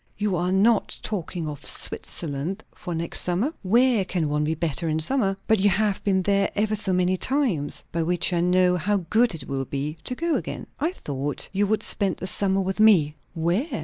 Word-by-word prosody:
"You 205 -2 0
are 180 +1 0
not 205 +4 +2
talking 175 -5 -3
of 145 -2 -7
Switzerland 165 +6 -2
for 175 -3 -6
next 165 +1 0
summer?" 195 - 0
"Where 235 +2 +3
can 175 -4 -1
one 150 0 0
be 155 +2 0
better 165 0 -1
in 155 0 0
summer?" 195 - 0
"But 220 -2 +3
you 205 +2 +4
have 205 +1 0
been 190 -2 +1
there 200 0 +2
ever 215 +1 +1
so 205 -2 0
many 180 0 +2
times!" 230 - 0
"By 165 - -1
which 175 +2 0
I 175 - +1
know 180 0 +3
how 195 +1 0
good 230 -3 +3
it 160 - -5
will 135 -1 -2
be 145 +4 -4
to 250 - -1
go 335 +4 -1
again." - - -3
"I 320 +4 0
thought 145 - -3
you 200 +1 +1
would 215 +1 0
spend 195 -3 0
the - - -6
summer 195 +1 +1
with 190 +2 -3
me!" 175 -9 +5 0.2
"Where?" 195 - -1
185 Hz, 205 wpm, -24 LUFS, 165-210 Hz, 0.2 s, me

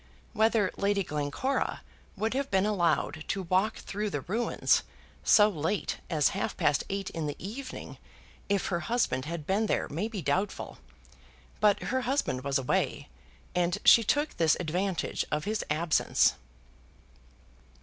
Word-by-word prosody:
Whether 220 -2 +3
Lady 200 0 +1
Glencora 150 - -2 0.3
would 220 +3 0
have 275 +1 -1
been 190 0 +2
allowed 170 -6 +1
to 195 - -2
walk 185 +5 +1
through 210 +1 -3
the 145 -7 -3
ruins 225 - +1 0.4
so 210 -1 +6
late 185 +1 -2
as 155 -4 +3
half - - -3
past 145 -3 +2
eight 195 -1 -3
in 160 -3 -3
the 145 - -3
evening 255 +8 -7 0.5
if 200 -2 +1
her 175 -3 0
husband 175 - 0
had 165 -1 -5
been 205 +5 +1
there - - 0
may 170 +9 -2
be 210 -6 -5
doubtful, 190 +8 -2 0.8
but 210 -1 +3
her 260 +1 0
husband 245 - -1
was 140 0 +1
away 130 - -1 0.4
and 175 0 +1
she 230 - +8
took 290 +7 0
this 160 -2 +3
advantage 180 +3 -1
of 150 0 0
his 215 +1 -1
absence. 155 +2 +3
195 Hz, 145 wpm, -29 LUFS, 160-215 Hz, 0.8 s, she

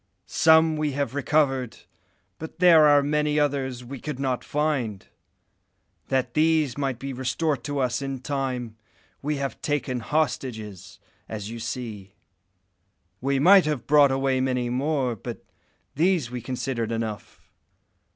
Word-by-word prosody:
Some 160 0 +4
we 150 -2 -1
have 140 -1 -2
recovered, 135 -4 0 0.6
but 160 0 -8
there 170 -4 +7
are 145 -1 +5
many 150 +1 +1
others 130 -4 -1
we 135 +2 -8
could 150 -1 -6
not 130 -2 -1
find. 140 -9 -2 1.0
That 130 -2 0
these 155 -3 +2
might 135 -3 -2
be 135 +2 -6
restored 130 +2 -1
to 145 -1 -3
us 125 -1 0
in 135 -2 -4
time, 130 -5 -3 0.4
we 150 +2 -1
have 140 -1 -4
taken 140 -4 -1
hostages, 110 - -3 0.3
as 105 -1 -5
you 115 - -7
see. 110 -4 -6 1.1
We 135 +1 +1
might 185 +6 +6
have 140 -7 -2
brought 145 +1 +6
away 135 -1 +1
many 125 -2 -1
more, 130 -2 0
but 100 - -8 0.5
these 160 -4 +1
we 125 -1 -5
considered 125 -2 -3
enough. 115 -2 -5
135 Hz, 135 wpm, -25 LUFS, 125-150 Hz, 1.1 s, there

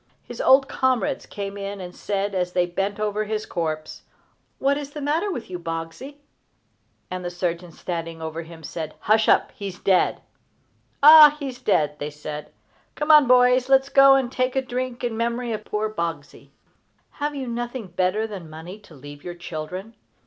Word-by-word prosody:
His - - -7
old 270 0 +5
comrades 255 -5 0
came 200 0 -6
in 200 0 -5
and 180 -1 -8
said, 200 0 -2
as 180 -1 -1
they 180 -1 +2
bent 195 +4 -3
over 215 0 -1
his 215 0 -3
corpse: 155 -3 -4 0.6
"What 275 +1 +2
is 285 -1 -5
the 300 - -6
matter 310 +8 0
with 245 -10 -5
you, 180 -1 -6
Boggsey?" 165 - -6 0.9
The 180 -1 -4
surgeon 175 0 -3
standing 165 -1 -5
over 160 0 -5
him 165 -1 -12
said: 155 +1 -6
"Hush 215 +1 +3
up! - - +3
he 200 - -7
is 180 -2 -7
dead!" 190 -2 +2 0.8
"Ah, 300 0 +10
he 280 -2 -3
is 250 0 -10
dead!" 150 -10 +1
they 145 - -3
said. 150 0 -8 0.4
"Come, 300 -2 +5
boys, 250 +1 +4
let 270 0 +6
us 270 - -14
go 275 0 +7
and 260 -2 0
take 255 0 -1
a 265 - +1
drink 255 -1 -4
in 240 -2 -1
memory 235 +1 -2
of 215 0 -5
poor 210 +1 -1
Boggsey!" 165 -8 -5 0.7
Have 295 0 -2
you 270 -2 -4
nothing 240 0 -4
better 185 +4 0
than 195 -7 -8
money 165 +6 -9
to 190 -6 -17
leave 145 +1 -12
your 175 -1 -6
children? 180 +5 -7
205 Hz, 180 wpm, -23 LUFS, 170-255 Hz, 0.9 s, Ah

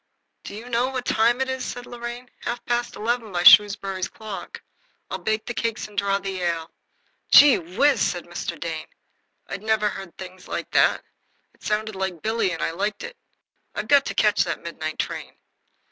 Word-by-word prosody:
"Do - - -8
you 225 +3 -9
know 245 +1 +1
what 255 -2 -4
time 235 +3 +2
it 265 - +1
is?" 260 -1 -3
said 245 0 -6
Lorraine. 240 +1 -7
"Half 240 0 -4
past 240 0 -1
eleven 230 0 -2
by 175 -1 -1
Shrewsbury 195 -1 +6
clock. 210 +2 -6 0.5
I'll - - -3
bake 215 0 -1
the 240 - -4
cakes 230 -2 -2
and 210 - -17
draw 200 0 +1
the 195 -2 -5
ale." 165 -2 -2 0.6
"Gee 285 -2 +8
whiz!" 205 - +2
said 175 -1 0
Mr. 175 -1 -5
Dane. 160 -2 -4 0.6
I'd 195 - -6
never 215 -1 +1
heard 195 -3 -9
things 185 0 -10
like - - -4
that. - - +3 0.5
It - - -31
sounded 215 0 -2
like 190 -4 -4
Billy, 220 -2 +1
and 165 - -3
I - - 0
liked 200 - -3
it. 480 +1 -7 0.6
"I've - - -3
got 285 -1 +6
to - - -4
catch - - +3
that - - -4
midnight - - -5
train." - - -4
215 Hz, 185 wpm, -24 LUFS, 190-240 Hz, 0.6 s, Gee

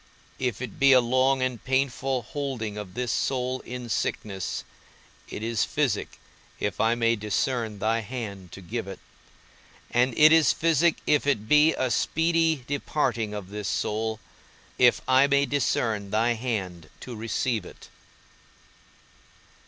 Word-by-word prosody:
If 125 -2 -2
it 130 - -8
be 135 -1 +6
a 130 - +8
long 130 +2 +2
and 125 -2 -3
painful 135 -1 0
holding 125 -5 -4
of 105 -3 -8
this 125 -1 -2
soul 130 0 -1
in 125 -1 -7
sickness, 100 -4 -3 0.7
it 105 - -6
is 115 -1 0
physic - - -1 0.4
if 105 -2 -3
I 115 +1 +3
may 115 0 +2
discern 110 +1 -2
thy 110 +3 0
hand 105 -6 -7
to 95 - -9
give 110 +4 -5
it; 95 - -8 0.9
and 120 0 +2
it 155 +1 +8
is 160 -1 +5
physic 165 0 +2
if 150 -1 +2
it 110 -7 0
be 150 +4 +5
a 130 -1 -1
speedy 160 +1 +1
departing 125 -6 -1
of 100 -2 -7
this 105 -1 -4
soul, 110 +1 -2 0.6
if 125 -1 +5
I 130 +2 +5
may 140 0 +3
discern 115 -7 -1
thy 115 +3 +2
hand 95 -9 -4
to 125 - -7
receive 115 0 -1
it. - - -13
120 Hz, 145 wpm, -26 LUFS, 110-135 Hz, 0.9 s, a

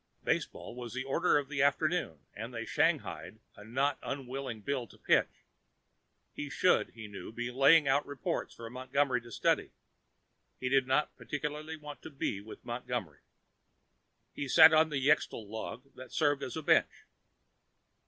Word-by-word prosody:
Baseball - - -2
was 120 -1 -7
the 130 - -2
order 150 +5 +2
of 145 -2 -1
the 140 -1 -1
afternoon 145 - +1
and 115 +3 -6
they 115 -1 -5
shanghaied 85 +7 0 0.2
a 105 - -12
not 135 +6 0
unwilling 135 -3 -5
Bill 125 +2 -2
to - - -18
pitch. - - +1 0.9
He 145 - -5
should, 180 - +3
he 110 -2 -8
knew, 100 +1 -8
be 120 +2 -4
laying 140 +4 +6
out 140 +2 +2
reports 145 -3 -3
for 115 - -8
Montgomery 130 0 0
to 120 0 -13
study. - - +1 0.9
He 130 - -1
did 135 -1 +3
not 135 +3 +1
particularly 150 +2 -4
want 150 -1 -10
to - - -8
be 135 -8 -3
with 110 +2 -12
Montgomery. 120 - -4 1.1
Bill 140 - -4
sat 160 +3 +9
on 160 0 +5
the 140 -2 -1
xetal 145 -7 +2
log 115 +5 -7
that 130 0 -11
served 145 -2 +2
as 130 - -5
a 160 - -4
bench. - - +2
135 Hz, 160 wpm, -32 LUFS, 120-145 Hz, 1.1 s, sat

